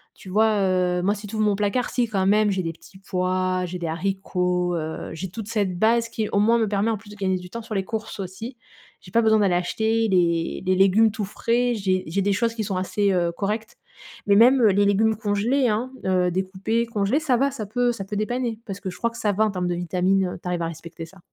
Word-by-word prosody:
Tu 190 Hz, -, -12 dB
vois, 215 Hz, +2 st, +3 dB
heu, 180 Hz, -1 st, +1 dB
moi 200 Hz, +2 st, +2 dB
si 205 Hz, 0 st, -9 dB
tu 205 Hz, -, -7 dB
ouvres 215 Hz, 0 st, +1 dB
mon 205 Hz, -1 st, +2 dB
placard, 210 Hz, +5 st, 0 dB
si, 245 Hz, -2 st, +1 dB
quand 195 Hz, -3 st, 0 dB
même 210 Hz, +1 st, +4 dB
j'ai 190 Hz, -1 st, -1 dB
des 165 Hz, -1 st, -3 dB
petits 185 Hz, +3 st, -17 dB
pois, 185 Hz, -1 st, -1 dB
j'ai 180 Hz, +1 st, -5 dB
des 170 Hz, -, -3 dB
haricots, 180 Hz, 0 st, -1 dB
heu, 160 Hz, -1 st, -4 dB
j'ai 180 Hz, +4 st, -5 dB
toute 220 Hz, +2 st, -7 dB
cette 205 Hz, -5 st, -1 dB
base 230 Hz, +2 st, +3 dB
qui 220 Hz, -2 st, -3 dB
au 200 Hz, -, +1 dB
moins 230 Hz, +3 st, +4 dB
me 225 Hz, -2 st, +1 dB
permet 205 Hz, +2 st, 0 dB
en 220 Hz, -, -1 dB
plus 210 Hz, +1 st, -16 dB
de -, -, -10 dB
gagner 190 Hz, -2 st, 0 dB
du 180 Hz, 0 st, -10 dB
temps 230 Hz, -, -5 dB
sur 220 Hz, -1 st, -6 dB
les 195 Hz, -, 0 dB
courses 220 Hz, 0 st, -5 dB
aussi. 200 Hz, +7 st, -7 dB, 0.4 s
J'ai 180 Hz, -, -14 dB
pas 230 Hz, -, +4 dB
besoin 220 Hz, -1 st, +4 dB
d'aller 195 Hz, -3 st, +2 dB
acheter 220 Hz, +5 st, 0 dB
les 170 Hz, -3 st, +1 dB
les 185 Hz, 0 st, +2 dB
légumes 195 Hz, +4 st, +4 dB
tout 215 Hz, -1 st, -3 dB
frais, 240 Hz, +4 st, 0 dB
j'ai 190 Hz, -3 st, 0 dB
j'ai 185 Hz, +5 st, -1 dB
des 200 Hz, +1 st, +2 dB
choses 230 Hz, +3 st, 0 dB
qui 220 Hz, -, -2 dB
sont 195 Hz, -2 st, -2 dB
assez, 200 Hz, +2 st, 0 dB
heu, 175 Hz, -2 st, +1 dB
correctes 210 Hz, +4 st, -3 dB, 0.5 s
mais 200 Hz, -, +5 dB
même, 250 Hz, +5 st, +6 dB
heu, 225 Hz, -, +6 dB
les 200 Hz, +1 st, +3 dB
légumes 215 Hz, +2 st, +3 dB
congelés, 225 Hz, +5 st, +1 dB
hein, 220 Hz, +4 st, -1 dB, 0.2 s
heu, 185 Hz, -1 st, +2 dB
découpés 190 Hz, +5 st, -1 dB
congelés, 225 Hz, +5 st, 0 dB
ça 260 Hz, -6 st, +2 dB
va 275 Hz, +2 st, +2 dB
ça 250 Hz, -6 st, -5 dB
peut 245 Hz, +4 st, +1 dB
ça 200 Hz, -, -6 dB
peut 205 Hz, +1 st, -4 dB
dépanner, 235 Hz, +1 st, -2 dB
parce 195 Hz, -1 st, -6 dB
que 190 Hz, -, -4 dB
je 180 Hz, -, -9 dB
crois 235 Hz, -, 0 dB
que -, -, -16 dB
ça 210 Hz, -, +1 dB
va 215 Hz, +3 st, +2 dB
en 215 Hz, -, 0 dB
termes 180 Hz, -2 st, -2 dB
de 175 Hz, -, -1 dB
vitamines, 185 Hz, +2 st, +1 dB
heu, -, -, -7 dB
tu -, -, -31 dB
arrives 175 Hz, -1 st, -1 dB
à -, -, -1 dB
respecter 165 Hz, +1 st, -8 dB
ça. 190 Hz, +4 st, -17 dB
200 Hz, 260 wpm, -23 LUFS, 185-220 Hz, 0.5 s, même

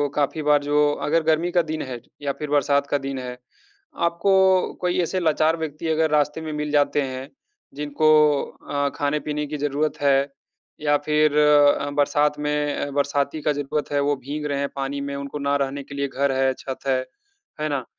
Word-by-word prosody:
काफ़ी 150 Hz, +2 st, 0 dB
बार 145 Hz, -1 st, +3 dB
जो 145 Hz, 0 st, +3 dB
अगर 160 Hz, +2 st, +2 dB
गर्मी 160 Hz, +2 st, +1 dB
का 175 Hz, -, +3 dB
दिन 155 Hz, 0 st, -4 dB
है 125 Hz, -3 st, -5 dB, 0.2 s
या 140 Hz, -1 st, -1 dB
फिर 150 Hz, -, -4 dB
बरसात 140 Hz, -1 st, +2 dB
का 145 Hz, -, +1 dB
दिन 135 Hz, -1 st, -4 dB
है, 125 Hz, -1 st, -6 dB, 0.6 s
आपको 190 Hz, +2 st, +3 dB
कोई 180 Hz, 0 st, 0 dB
ऐसे 185 Hz, +2 st, -1 dB
लाचार 160 Hz, 0 st, +2 dB
व्यक्ति 160 Hz, 0 st, -5 dB
अगर 160 Hz, 0 st, +2 dB
रास्ते 150 Hz, +1 st, +1 dB
में 155 Hz, -1 st, -5 dB
मिल 150 Hz, 0 st, -3 dB
जाते 145 Hz, 0 st, +2 dB
हैं 130 Hz, 0 st, -5 dB, 0.5 s
जिनको 150 Hz, +1 st, +1 dB, 0.6 s
अ, 145 Hz, 0 st, 0 dB
खाने-पीने 150 Hz, +1 st, -1 dB
की 150 Hz, +1 st, -4 dB
ज़रूरत 145 Hz, +1 st, -1 dB
है 140 Hz, 0 st, +3 dB, 0.5 s
या 145 Hz, -1 st, +3 dB
फिर 150 Hz, -1 st, +3 dB
अ, 145 Hz, -1 st, +4 dB
बरसात 145 Hz, +1 st, +1 dB
में 150 Hz, -1 st, -1 dB
बरसाती 140 Hz, +1 st, 0 dB
का 150 Hz, -, +1 dB
ज़रूरत 145 Hz, +1 st, -3 dB
है, 145 Hz, -, +1 dB
वो 145 Hz, +1 st, +1 dB
भीग 145 Hz, +3 st, -6 dB
रहे 140 Hz, -1 st, -2 dB
हैं 140 Hz, 0 st, -1 dB
पानी 140 Hz, +1 st, -3 dB
में, 140 Hz, 0 st, -4 dB
उनको 140 Hz, +1 st, -5 dB
ना 140 Hz, 0 st, 0 dB
रहने 140 Hz, +1 st, -6 dB
के 140 Hz, -, -10 dB
लिए 140 Hz, 0 st, -1 dB
घर 140 Hz, +1 st, 0 dB
है 130 Hz, 0 st, +1 dB
छत 135 Hz, 0 st, -7 dB
है, 130 Hz, -1 st, +2 dB, 0.6 s
है 155 Hz, -, 0 dB
ना? 140 Hz, -4 st, -2 dB
145 Hz, 190 wpm, -23 LUFS, 140-150 Hz, 0.6 s, अ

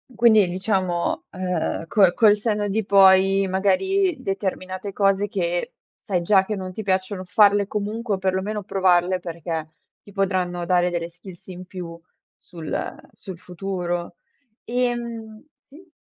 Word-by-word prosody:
Quindi 220 Hz, -5 st, +5 dB
diciamo, 185 Hz, -1 st, -1 dB
uhm, 180 Hz, -3 st, -2 dB
col 190 Hz, -3 st, +4 dB
col 210 Hz, -3 st, +5 dB
senno 210 Hz, -1 st, -1 dB
di 215 Hz, 0 st, -1 dB
poi, 195 Hz, 0 st, +5 dB
magari 350 Hz, -, +1 dB
determinate 195 Hz, 0 st, -4 dB
cose 200 Hz, 0 st, +2 dB
che 175 Hz, -4 st, -2 dB, 0.2 s
sai 180 Hz, -4 st, -2 dB
già 190 Hz, +1 st, +3 dB
che 210 Hz, -, -3 dB
non 185 Hz, -1 st, -6 dB
ti 220 Hz, -, -6 dB
piacciono 185 Hz, -1 st, -2 dB
farle 205 Hz, +1 st, +4 dB
comunque, 210 Hz, +1 st, -2 dB
o -, -, -5 dB
perlomeno 190 Hz, +2 st, -2 dB
provarle 185 Hz, -1 st, +2 dB
perché 165 Hz, -2 st, -5 dB, 0.3 s
ti 205 Hz, -, -16 dB
potranno 185 Hz, -3 st, -1 dB
dare 180 Hz, 0 st, +2 dB
delle 170 Hz, -1 st, -3 dB
skills 175 Hz, +1 st, -14 dB
in 185 Hz, 0 st, -9 dB
più 175 Hz, -2 st, -8 dB, 0.4 s
sul 165 Hz, -3 st, -6 dB, 0.2 s
sul 185 Hz, -3 st, -10 dB
futuro. 175 Hz, -1 st, -4 dB, 0.5 s
Ehm 235 Hz, -2 st, -3 dB, 0.2 s
sì? 330 Hz, +6 st, -17 dB
190 Hz, 135 wpm, -23 LUFS, 180-205 Hz, 0.5 s, Quindi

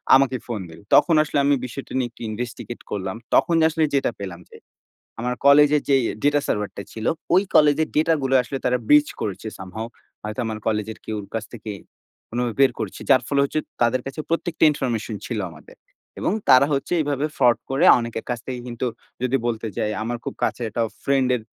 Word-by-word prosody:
আমাকে 130 Hz, -1 st, +3 dB
ফোন 115 Hz, -3 st, -3 dB
দিল। 80 Hz, 0 st, -12 dB, 0.2 s
তখন 165 Hz, -, +5 dB
আসলে 150 Hz, -, -3 dB
আমি 145 Hz, 0 st, +4 dB
বিষয়টা 130 Hz, +2 st, -8 dB
নিয়ে 125 Hz, -2 st, 0 dB
একটু -, -, -18 dB
investigate 120 Hz, +1 st, -6 dB
করলাম। 95 Hz, -1 st, -3 dB, 0.2 s
তখন 170 Hz, -, +4 dB
আসলে 160 Hz, 0 st, 0 dB
যেটা 135 Hz, -3 st, +2 dB
পেলাম 95 Hz, -4 st, -6 dB
যে, -, -, -13 dB, 0.6 s
আমার 125 Hz, +2 st, -1 dB
কলেজের 145 Hz, +1 st, +6 dB
যে 140 Hz, -, +6 dB, 0.3 s
data 145 Hz, 0 st, +4 dB
server 105 Hz, -1 st, -1 dB
টা 100 Hz, -, -4 dB
ছিল, 110 Hz, 0 st, -6 dB, 0.3 s
ওই 185 Hz, +2 st, +5 dB
কলেজের 150 Hz, +1 st, +5 dB
ডেটা 160 Hz, +2 st, +3 dB
গুলো 135 Hz, 0 st, +2 dB
আসলে 135 Hz, +2 st, -4 dB
তারা 125 Hz, 0 st, +3 dB
breach 150 Hz, 0 st, +5 dB
করেছে 105 Hz, +1 st, -4 dB
somehow। 95 Hz, +4 st, -6 dB, 0.4 s
হয়তো 105 Hz, +3 st, -5 dB
আমার 110 Hz, -1 st, -3 dB
কলেজের 110 Hz, 0 st, -1 dB
কেউর 105 Hz, -2 st, -4 dB
কাছ 110 Hz, -, -2 dB
থেকে 110 Hz, -2 st, -7 dB, 0.6 s
কোনোভাবে 120 Hz, -1 st, -2 dB
বের 135 Hz, -1 st, +6 dB
করেছে। 110 Hz, -4 st, -5 dB
যার 130 Hz, -3 st, +6 dB
ফলে 140 Hz, -1 st, +2 dB
হচ্ছে 140 Hz, +2 st, -1 dB, 0.2 s
তাদের 120 Hz, +2 st, +3 dB
কাছে 135 Hz, +3 st, -6 dB
প্রত্যেকটা 165 Hz, 0 st, -1 dB
ইনফরমেশন 120 Hz, -6 st, -2 dB
ছিল 115 Hz, -3 st, -3 dB
আমাদের। 80 Hz, -, -15 dB, 0.4 s
এবং -, -, 0 dB, 0.2 s
তারা 130 Hz, +2 st, +7 dB
হচ্ছে 135 Hz, +5 st, -1 dB
এভাবে 145 Hz, -1 st, -1 dB
fraud 120 Hz, -3 st, +4 dB
করে 135 Hz, +1 st, +2 dB
অনেকের 115 Hz, -1 st, -5 dB
কাছ 120 Hz, -1 st, -1 dB
থেকে 130 Hz, -1 st, -4 dB
কিন্তু 120 Hz, +1 st, -3 dB, 0.4 s
যদি 130 Hz, +2 st, +2 dB
বলতে 115 Hz, -1 st, -2 dB
চাই 105 Hz, -, 0 dB
আমার 120 Hz, +2 st, -3 dB
খুব -, -, -4 dB
কাছের 120 Hz, -, -1 dB
একটা 115 Hz, +2 st, -1 dB, 0.2 s
ফ্রেন্ডের 130 Hz, -3 st, +2 dB
125 Hz, 190 wpm, -23 LUFS, 110-140 Hz, 0.6 s, তারা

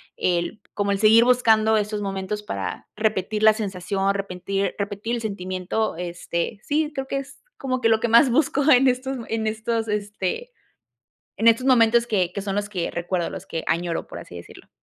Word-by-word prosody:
el 175 Hz, +4 st, -1 dB
como 200 Hz, 0 st, 0 dB
el 195 Hz, -, -2 dB
seguir 220 Hz, +2 st, +6 dB
buscando 220 Hz, -3 st, +4 dB
estos 210 Hz, 0 st, -1 dB
momentos 195 Hz, +1 st, -3 dB
para 210 Hz, -, -5 dB
repetir 215 Hz, 0 st, -1 dB
la 220 Hz, -, +8 dB
sensación, 195 Hz, -2 st, -1 dB
repentir 195 Hz, 0 st, -2 dB
repetir 205 Hz, +3 st, -3 dB
el 235 Hz, -, -4 dB
sentimiento, 185 Hz, -1 st, -3 dB
este, 175 Hz, +3 st, -4 dB
sí, 300 Hz, +1 st, 0 dB
creo 270 Hz, -1 st, -4 dB
que 275 Hz, -, -2 dB
es 275 Hz, 0 st, -8 dB
como 255 Hz, -1 st, -2 dB
que 225 Hz, -, +3 dB
lo 220 Hz, -1 st, +4 dB
que 235 Hz, -, 0 dB
más 235 Hz, +3 st, +6 dB
busco 285 Hz, +2 st, +2 dB
en 265 Hz, 0 st, +6 dB
estos 260 Hz, +1 st, 0 dB
en 220 Hz, -1 st, -2 dB
estos, 225 Hz, +1 st, -2 dB
este, 210 Hz, -, -3 dB, 0.8 s
en 225 Hz, -, +2 dB
estos 230 Hz, +3 st, +4 dB
momentos 235 Hz, -2 st, +4 dB
que 190 Hz, -7 st, 0 dB
que 200 Hz, -, -4 dB
son 195 Hz, -1 st, -3 dB
los 205 Hz, 0 st, -2 dB
que 180 Hz, -5 st, -3 dB
recuerdo, 175 Hz, 0 st, -2 dB
los -, -, -8 dB
que 165 Hz, -, -4 dB
añoro, 170 Hz, 0 st, -1 dB
por -, -, -8 dB
así -, -, -11 dB
decirlo. 85 Hz, -, -13 dB
215 Hz, 185 wpm, -23 LUFS, 195-235 Hz, 0.8 s, la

